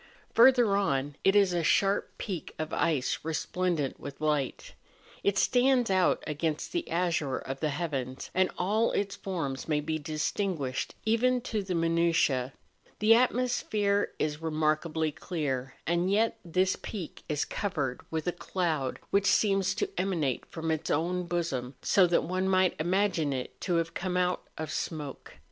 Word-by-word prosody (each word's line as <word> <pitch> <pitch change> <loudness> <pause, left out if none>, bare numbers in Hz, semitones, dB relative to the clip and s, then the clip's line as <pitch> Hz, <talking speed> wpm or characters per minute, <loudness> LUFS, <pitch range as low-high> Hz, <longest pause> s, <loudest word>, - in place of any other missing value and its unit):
Further 240 -4 +6
on, 145 -8 0
it 195 - +4
is 200 -3 +5
a 170 -1 0
sharp 195 +5 +2
peak 185 -7 -5
of 155 0 -4
ice 150 -6 +1
resplendent 160 -1 -1
with 140 -1 -8
light; 150 -3 -1 0.5
it 200 -1 +2
stands 250 -1 +3
out 185 -1 +3
against 155 +1 -2
the 345 -1 -2
azure 165 -6 0
of 135 0 -6
the 155 - 0
heavens, 140 -4 -4
and 185 0 +3
all 215 +5 +2
its 200 0 -1
forms 165 -10 -4
may 150 -2 +1
be 155 +1 -2
distinguished 155 -2 -2
even 245 +3 +3
to 220 -3 -2
the 190 -2 -3
minutiae; 165 -6 +2 0.5
the 215 +2 +6
atmosphere 225 -4 +1
is 150 0 -2
remarkably 155 0 0
clear, 135 -6 -3
and 170 +2 +1
yet 225 +3 +2
this 185 +2 +1
peak 190 -7 -6
is 150 -1 0
covered 150 - -2
with 160 -1 -3
a 175 - +1
cloud 165 -6 -2
which 200 0 +3
seems 195 -3 +3
to 410 - 0
emanate 160 -10 -1
from 160 -1 -3
its 160 -1 -2
own 175 +3 0
bosom, 140 -7 -2
so 190 -3 +5
that 170 - +2
one 185 +3 -1
might 185 -1 +3
imagine 175 -3 +1
it 130 -2 -5
to 180 - 0
have 165 0 0
come 180 0 -2
out 180 0 +1 0.2
of 155 -1 -4
smoke. 150 -5 -5
170 Hz, 155 wpm, -29 LUFS, 150-195 Hz, 0.5 s, Further